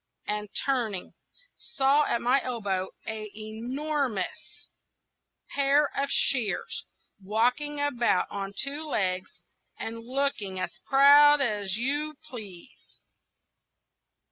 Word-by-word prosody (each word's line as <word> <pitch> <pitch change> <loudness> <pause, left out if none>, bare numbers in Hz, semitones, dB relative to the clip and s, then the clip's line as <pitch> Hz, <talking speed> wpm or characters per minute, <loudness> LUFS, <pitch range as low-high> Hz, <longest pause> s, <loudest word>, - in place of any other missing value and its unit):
and 210 0 -2 0.2
turning, 235 -9 -1 0.4
saw 285 - +2
at 235 - -1
my 255 +3 +3
elbow 200 -7 -2 0.2
an 220 -1 -5
enormous 235 +1 -3 0.9
pair 280 +1 +2
of 275 0 -1
shears, 240 -9 0 0.4
walking 245 +9 0
about 245 -9 +2
on 195 -1 -4
two 280 +8 -2
legs, 185 -11 -2 0.4
and 230 +1 -5
looking 255 -7 -1
as 185 -1 -5
proud 290 +2 +7
as 210 -6 0
you 290 +5 -1
please. 215 - -11
245 Hz, 95 wpm, -27 LUFS, 210-280 Hz, 0.9 s, proud